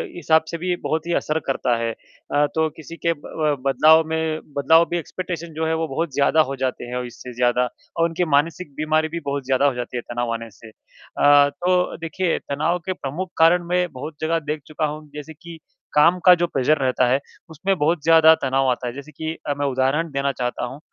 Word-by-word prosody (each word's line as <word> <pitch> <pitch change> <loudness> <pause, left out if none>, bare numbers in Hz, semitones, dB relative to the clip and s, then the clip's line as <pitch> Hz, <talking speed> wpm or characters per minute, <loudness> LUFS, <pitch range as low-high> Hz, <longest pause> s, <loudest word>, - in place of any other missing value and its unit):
हिसाब 160 -2 +3
से 170 - -3
भी 180 +1 -1
बहुत 160 +2 -2
ही 175 - 0
असर 155 +1 -1
करता 130 -3 +1
है। 115 0 -1
अ, 145 +5 -3
तो 160 0 +2
किसी 165 +1 -10
के 170 - +3
ब 150 0 -2
बदलाव 155 +4 +5
में 160 -1 -1 0.2
बदलाव 160 +4 +5
भी 175 - -1
एक्सपेक्टेशन 170 -1 -6
जो 160 +1 -2
है 160 - 0
वो 160 0 -1
बहुत 155 +1 -3
ज़्यादा 145 +3 +3
हो - - -3
जाते 130 -2 -3
हैं 120 +1 -6
और 125 - -3
इससे 125 +1 -10
ज़्यादा 125 0 +2 0.3
और 165 0 +3
उनकी 170 +2 -1
मानसिक 155 +1 -1
बीमारी 155 +1 +1
भी 170 - -4
बहुत 140 -2 -3
ज़्यादा 135 +1 +2
हो 140 - +3
जाती 125 0 -5
है - - -2
तनाव 120 -1 -2
आने 115 0 -6
से। 110 +3 -15
अ, 145 +5 +2
तो 180 +5 0
देखिए 170 +1 -1
तनाव 155 +5 0
के - - -6
प्रमुख 170 +4 -5
कारण 170 +2 +5
मैं 180 0 +1
बहुत 150 +5 -7
जगह 165 +1 +1
देख 150 0 -4
चुका 155 0 -2
हूँ 150 0 -6
जैसे 150 +2 -8
कि 170 +2 -12 0.4
काम 165 +4 +5
का 180 - +10
जो 175 0 0
प्रेशर 150 0 +1
रहता 130 -2 +1
है, 130 +2 +2 0.3
उसमें 190 +5 -1
बहुत 155 +1 +1
ज़्यादा 160 -1 +7
तनाव 135 0 +1
आता 125 0 -3
है। 120 - -4
जैसे 140 +3 -10
कि 160 +2 -4
अ, 145 - +1
मैं 145 - 0
उदाहरण 135 +5 0
देना 140 0 0
चाहता 125 -1 -3
हूँ, 130 +3 -8
155 Hz, 220 wpm, -22 LUFS, 135-165 Hz, 0.4 s, का